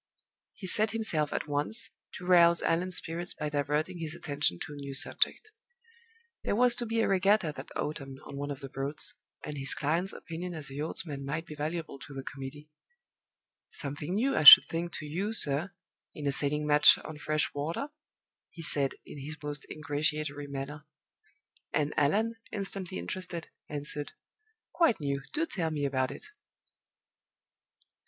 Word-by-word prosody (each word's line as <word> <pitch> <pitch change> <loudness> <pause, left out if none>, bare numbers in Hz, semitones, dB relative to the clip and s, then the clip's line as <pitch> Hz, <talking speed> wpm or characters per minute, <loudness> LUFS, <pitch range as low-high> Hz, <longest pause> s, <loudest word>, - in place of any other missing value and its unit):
He 195 - -9
set 215 +3 +1
himself 170 -10 +1
at - - -2
once 150 +11 -2 0.2
to 180 - -8
rouse 170 -1 +6
Allan's 175 +2 +1
spirits 170 +2 -2
by 150 -1 -3
diverting 150 +4 -1
his 160 0 -4
attention 145 - 0
to 150 - -6
a - - -8
new 140 -1 -6
subject. 435 - 0 0.9
There - - 0
was 245 +1 +5
to 240 - -1
be 225 +1 +1
a - - +2
regatta 195 -3 +3
that - - -8
autumn 135 -3 -4
on 140 - -8
one 145 +1 -4
of 140 -1 -5
the 135 - -7
Broads, 135 +3 -2 0.3
and 150 -2 -5
his 135 0 +2
client's 165 +6 0
opinion 170 +2 -6
as 150 -3 -5
a - - -8
yachtsman 150 -1 -3
might 145 +4 -3
be 155 - -9
valuable 155 -1 -4
to 140 - -10
the 135 - -5
committee. 145 +3 -8 1.0
"Something 145 +5 -3
new, 260 +6 +1
I - - +2
should 150 - +13
think, 170 +1 -3
to 155 - -5
you, 190 +9 -2
sir, 155 -1 +3 0.4
in 150 - -6
a 140 - +2
sailing 150 +2 0
match 150 0 +7
on 155 -1 -8
fresh 155 0 0
water?" 165 - -3 0.6
he 165 - -8
said, 140 -3 +3
in 145 - -9
his 150 +3 -6
most 145 -1 -4
ingratiatory 150 -1 -2
manner. 140 +2 -6 0.9
And 150 -1 +1
Allan, 215 +10 +2
instantly 195 - -4
interested, 170 - -4 0.2
answered, 145 0 -3 0.6
"Quite 330 -10 +3
new. 140 -2 -2
Do 320 +2 0
tell 175 - -1
me 150 -2 -2
about 130 -2 0
it!" - - -9
150 Hz, 165 wpm, -30 LUFS, 145-175 Hz, 1.0 s, should